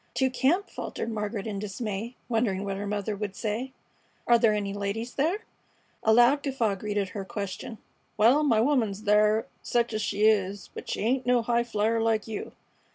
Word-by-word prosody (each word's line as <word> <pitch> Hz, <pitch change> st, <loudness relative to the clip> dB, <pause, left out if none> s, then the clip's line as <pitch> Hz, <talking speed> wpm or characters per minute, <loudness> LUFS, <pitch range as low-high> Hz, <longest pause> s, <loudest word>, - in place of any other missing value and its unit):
"To 260 Hz, -1 st, +2 dB
camp!" 305 Hz, +10 st, +2 dB
faltered 230 Hz, -, -4 dB
Margaret 210 Hz, -1 st, -3 dB
in 205 Hz, -3 st, -3 dB
dismay, 210 Hz, +2 st, -4 dB
wondering 225 Hz, -5 st, 0 dB
what 195 Hz, -1 st, -2 dB
her 200 Hz, +1 st, -4 dB
mother 205 Hz, 0 st, -2 dB
would 200 Hz, -1 st, -4 dB
say. 230 Hz, +4 st, -3 dB, 0.5 s
"Are 235 Hz, -1 st, +5 dB
there 225 Hz, -2 st, +4 dB
any 200 Hz, -1 st, -2 dB
ladies 205 Hz, +4 st, -3 dB
there?" 335 Hz, +9 st, 0 dB, 0.6 s
A 220 Hz, -, +3 dB
loud 240 Hz, +5 st, +5 dB
guffaw 260 Hz, -7 st, 0 dB
greeted 205 Hz, 0 st, -2 dB
her 200 Hz, +1 st, -5 dB
question. 200 Hz, +3 st, -5 dB, 0.4 s
"Wal, 240 Hz, +8 st, +5 dB
my 235 Hz, -8 st, +3 dB
woman's 225 Hz, -7 st, +1 dB
thar, 210 Hz, +1 st, +3 dB, 0.2 s
sech 235 Hz, -1 st, 0 dB
es 215 Hz, -, -1 dB
she 205 Hz, 0 st, +1 dB
is; 200 Hz, -2 st, +1 dB
but -, -, -8 dB
she -, -, -2 dB
ain't 250 Hz, +4 st, 0 dB
no 245 Hz, -1 st, +3 dB
highflier 230 Hz, -1 st, +1 dB
like 225 Hz, -1 st, +1 dB
you. 220 Hz, -2 st, -5 dB
220 Hz, 175 wpm, -27 LUFS, 205-240 Hz, 0.6 s, Are